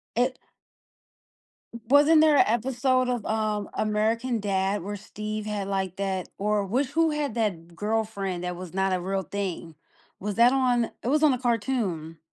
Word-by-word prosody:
It 250 Hz, +2 st, +1 dB, 1.4 s
W 235 Hz, -, -8 dB
wasn't 295 Hz, +4 st, +6 dB
there 310 Hz, -1 st, +5 dB
a -, -, +7 dB
episode 255 Hz, +2 st, +1 dB
of, 245 Hz, -4 st, -2 dB
um, 215 Hz, -2 st, -1 dB
American 220 Hz, +3 st, 0 dB
Dad 195 Hz, -1 st, 0 dB
where 205 Hz, +2 st, -4 dB
Steve 215 Hz, +1 st, -6 dB
had, 205 Hz, -2 st, -3 dB
like, 190 Hz, -2 st, -2 dB
that 190 Hz, -2 st, -2 dB
or 205 Hz, 0 st, 0 dB
which 255 Hz, +7 st, 0 dB
who 325 Hz, +3 st, +2 dB
had 295 Hz, -5 st, -2 dB
that 175 Hz, -7 st, -2 dB
girlfriend 205 Hz, -4 st, -2 dB
that 180 Hz, -1 st, -3 dB
was 180 Hz, -2 st, -8 dB
not 190 Hz, 0 st, +1 dB
a 185 Hz, -, +1 dB
real 190 Hz, +2 st, -2 dB
thing? 180 Hz, -4 st, -5 dB, 0.4 s
Was 205 Hz, +1 st, -3 dB
that 235 Hz, +3 st, +6 dB
on 250 Hz, -3 st, +2 dB
it -, -, -5 dB
was 300 Hz, +4 st, +2 dB
on 300 Hz, -3 st, +6 dB
a 250 Hz, -, -2 dB
cartoon. 210 Hz, -10 st, -1 dB
215 Hz, 170 wpm, -26 LUFS, 195-250 Hz, 1.4 s, a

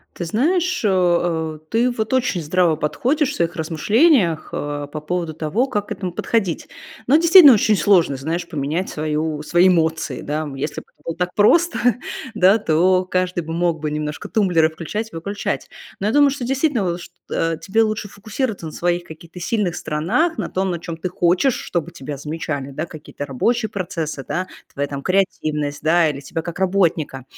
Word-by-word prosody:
Ты 175 Hz, -, -4 dB
знаешь, 340 Hz, -, +1 dB
э, 175 Hz, -5 st, +1 dB
ты 235 Hz, +3 st, +2 dB
вот 220 Hz, -1 st, -2 dB
очень 245 Hz, -8 st, +1 dB
здраво 165 Hz, +1 st, +2 dB
подходишь 260 Hz, -, 0 dB
в -, -, -6 dB
своих 170 Hz, +2 st, -1 dB
размышлениях, 175 Hz, -, +2 dB
э, 145 Hz, 0 st, -4 dB
по 155 Hz, -, -4 dB
поводу 165 Hz, +1 st, -3 dB
того, 165 Hz, -, -1 dB
как 205 Hz, -5 st, -2 dB
к -, -, -14 dB
этому 185 Hz, -3 st, -4 dB
подходить. 195 Hz, -2 st, -1 dB, 0.4 s
Но, 275 Hz, -, +5 dB
действительно, 330 Hz, -3 st, +9 dB
очень 210 Hz, -1 st, +3 dB
сложно, 175 Hz, -9 st, +3 dB
знаешь, 165 Hz, +6 st, -3 dB
поменять 155 Hz, +4 st, -2 dB
свою 155 Hz, 0 st, -2 dB
свои 175 Hz, +4 st, +4 dB
эмоции, 160 Hz, -2 st, 0 dB
да. 155 Hz, +2 st, -2 dB
Если 135 Hz, +3 st, -4 dB
б -, -, -25 dB
это -, -, -32 dB
было 165 Hz, -, -3 dB
так 180 Hz, +1 st, -2 dB
просто, 335 Hz, +12 st, +4 dB, 0.6 s
да, 195 Hz, +2 st, +5 dB
то 185 Hz, 0 st, +2 dB
каждый 185 Hz, -1 st, -1 dB
бы 160 Hz, -, -6 dB
мог 170 Hz, -1 st, 0 dB
бы 155 Hz, -, -2 dB
немножко 150 Hz, 0 st, -4 dB
тумблеры 180 Hz, -7 st, +2 dB
включать 210 Hz, +8 st, -5 dB
и -, -, -9 dB
выключать. 200 Hz, +5 st, -3 dB, 0.3 s
Но 200 Hz, -, +1 dB
я 220 Hz, -, 0 dB
думаю, 290 Hz, -1 st, +6 dB
что 270 Hz, -2 st, -4 dB
действительно 265 Hz, -, 0 dB
лу 170 Hz, -, -2 dB
шт 175 Hz, -, -12 dB, 0.2 s
э, 165 Hz, -1 st, 0 dB
тебе 220 Hz, +3 st, +1 dB
лучше 215 Hz, -2 st, -2 dB
фокусироваться 215 Hz, 0 st, -4 dB
на 155 Hz, -, -7 dB
своих 175 Hz, 0 st, -1 dB
каких-то 170 Hz, +2 st, -11 dB
сильных 180 Hz, -1 st, -1 dB
сторонах, 220 Hz, -, 0 dB
на -, -, -3 dB
том, 190 Hz, 0 st, -1 dB
на 170 Hz, -, -3 dB
чём 170 Hz, -1 st, -6 dB
ты 185 Hz, -, -3 dB
хочешь, 180 Hz, +7 st, +2 dB
чтобы 170 Hz, -1 st, -3 dB
тебя 145 Hz, -3 st, -7 dB
замечали, 145 Hz, -2 st, -4 dB
да, 155 Hz, +5 st, -3 dB
какие-то 155 Hz, -3 st, -8 dB
рабочие 220 Hz, -, 0 dB
процессы, 160 Hz, -7 st, -4 dB
да, 185 Hz, +1 st, -2 dB, 0.3 s
твоя 140 Hz, 0 st, -2 dB
там 140 Hz, -1 st, -5 dB
креативность, 155 Hz, -6 st, 0 dB
да, 160 Hz, +1 st, +3 dB
или 140 Hz, -1 st, -4 dB
тебя 160 Hz, +3 st, -5 dB
как 170 Hz, +3 st, -7 dB
работника. 170 Hz, -8 st, +1 dB
175 Hz, 185 wpm, -20 LUFS, 155-210 Hz, 0.6 s, действительно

